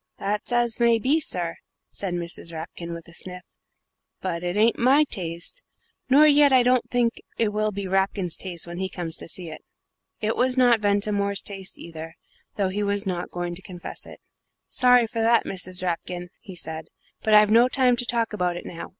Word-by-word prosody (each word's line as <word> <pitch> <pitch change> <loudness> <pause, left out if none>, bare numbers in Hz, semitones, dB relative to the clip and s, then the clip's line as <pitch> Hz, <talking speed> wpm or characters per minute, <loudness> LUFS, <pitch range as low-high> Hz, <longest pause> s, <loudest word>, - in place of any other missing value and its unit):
"That's 205 +4 -2
as 240 -1 +1
may 235 -1 +5
be 270 +8 +2
sir," 175 - -2 0.3
said 185 -3 -3
Mrs. 170 -1 -5
Rapkin, 170 +1 -7
with 170 0 -8
a 170 - -15
sniff, 180 0 -5 0.8
"but 170 -3 -3
it 175 +2 -2
ain't 225 +2 +3
my 270 +5 +5
taste, 180 - -5 0.5
nor 285 +4 +7
yet 290 -1 +6
I 255 -2 +6
don't 250 0 +2
think 240 -2 0 0.2
it 225 -2 +2
will 215 +1 0
be 200 0 -4
Rapkin's 190 -2 0
taste 175 -3 -2
when 175 +1 -7
he 190 0 -2
comes 170 -3 -5
to - - -8
see 170 0 -5
it." 155 - -9 0.6
It 215 +1 0
was 255 +1 +1
not 245 -3 +5
Ventimore's 200 -1 +1
taste 195 -2 -7
either, 165 -1 -9 0.4
though 195 -2 0
he 200 +2 -2
was 200 0 0
not 180 -2 -3
going 175 0 -4
to 175 - -7
confess 180 -2 -8
it. - - -12 0.5
"Sorry 250 -1 +5
for 230 0 -3
that, 230 +1 +4
Mrs. 185 -1 -2
Rapkin," 180 0 -3
he 190 - -11
said, 160 -2 -6 0.3
"but 215 -1 +4
I've 210 0 +6
no 235 +3 +6
time 255 -1 +3
to 245 - +1
talk 230 -3 0
about 180 -3 -1
it - - -8
now. 170 - -7
200 Hz, 195 wpm, -25 LUFS, 175-235 Hz, 0.8 s, nor